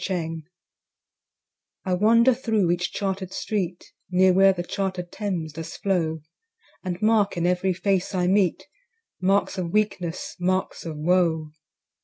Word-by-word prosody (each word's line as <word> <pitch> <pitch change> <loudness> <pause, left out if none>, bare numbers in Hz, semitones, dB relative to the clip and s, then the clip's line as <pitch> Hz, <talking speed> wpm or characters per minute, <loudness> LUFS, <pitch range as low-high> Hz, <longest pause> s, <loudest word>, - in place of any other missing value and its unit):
London 165 -3 -3 1.4
I 185 - 0
wander 230 +6 +5
thro' 220 -7 +1
each 180 +1 -1
charter'd 190 -2 -3
street, 185 -5 -3 0.2
Near 185 0 +4
where 195 +1 +6
the 175 -2 -3
charter'd 185 -2 -3
Thames 180 -7 -3
does 165 +1 -7
flow, 165 -5 -1 0.6
And 180 -1 -3
mark 215 -3 +3
in 170 - 0
every 180 +1 +1
face 190 +1 0
I 180 -1 +1
meet 190 -1 +2 0.6
Marks 195 +1 +1
of 175 -2 -2
weakness, 195 -5 -1
marks 185 -1 -1
of 155 -2 -5
woe. 160 -1 +1
185 Hz, 135 wpm, -24 LUFS, 175-195 Hz, 1.4 s, where